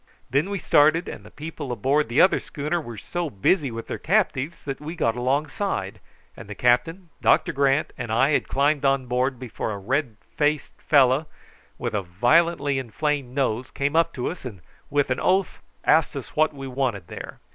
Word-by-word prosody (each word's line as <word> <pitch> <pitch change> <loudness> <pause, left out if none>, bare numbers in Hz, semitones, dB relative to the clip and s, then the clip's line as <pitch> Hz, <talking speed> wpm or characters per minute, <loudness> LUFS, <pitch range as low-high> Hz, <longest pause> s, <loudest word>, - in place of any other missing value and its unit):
Then 140 +8 +1
we 200 - -2
started, 160 0 +3
and - - -7
the - - -13
people 150 -3 -7
aboard 135 +2 +1
the 120 - +1
other 185 - +5
schooner 155 +3 -3
were 120 -6 -9
so 175 +9 -3
busy 140 - +1
with 115 -1 -6
their - - -5
captives 170 -5 0
that 140 0 -5
we 160 +3 -6
got 115 -9 0
alongside, 145 +10 -1 0.4
and - - -11
the 105 - -6
captain, 145 - +1
Doctor - - +3
Grant, 140 +2 +1
and 120 -2 -4
I 130 +6 +3
had - - +1
climbed 145 +1 +1
on 135 -2 +2
deck 125 +2 0
before 120 -2 -5
a 100 - -4
red 125 +3 -2 0.2
faced 150 0 -1
fellow 140 +1 +4 0.5
with 120 -2 -3
a 105 - 0
violently 140 - +2
inflamed 135 +1 -2
nose 130 -3 0
came 140 +2 -2
up 165 0 +3
to 125 - -4
us, 180 - -10
and, 110 -8 -8 0.3
with 145 -2 +1
an 130 - 0
oath, 190 -1 +1 0.2
asked 160 -1 +3 0.2
what 155 +1 +3
we 135 -2 -8
wanted 125 -8 -2
there. - - -9
140 Hz, 185 wpm, -24 LUFS, 125-155 Hz, 0.5 s, other